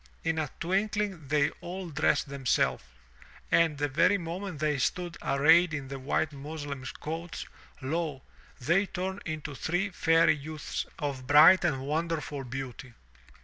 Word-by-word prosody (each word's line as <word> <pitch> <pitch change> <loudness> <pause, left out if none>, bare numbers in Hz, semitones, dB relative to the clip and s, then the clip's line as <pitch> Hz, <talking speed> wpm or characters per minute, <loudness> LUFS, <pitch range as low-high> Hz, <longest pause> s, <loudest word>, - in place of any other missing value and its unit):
In 165 -1 0
a 150 -3 -2
twinkling 195 -2 -1
they 145 +1 +2
all 180 0 -6
dressed 145 - +1
themselves, 135 -2 0 0.7
and 165 -3 +4
the 145 +1 0
very 150 +8 +3
moment 175 0 -5
they 150 -1 0
stood 175 +8 -1
arrayed 160 +4 +4
in 135 -2 -6
the 135 0 -5
white 145 +3 -1
muslin 145 -1 -6 0.2
coats, 165 +2 -5 0.4
lo! 150 -1 -2 0.4
they 170 +10 +2
tumed 190 +1 -4
into 155 -2 -4
three 175 +8 -1
fairy 165 -1 +4
youths 150 +1 -5
of 135 -3 -4
bright 150 +7 +8
and 140 -7 +1
wonderful 155 -2 -2
beauty. 130 -1 -7
155 Hz, 140 wpm, -29 LUFS, 140-175 Hz, 0.7 s, bright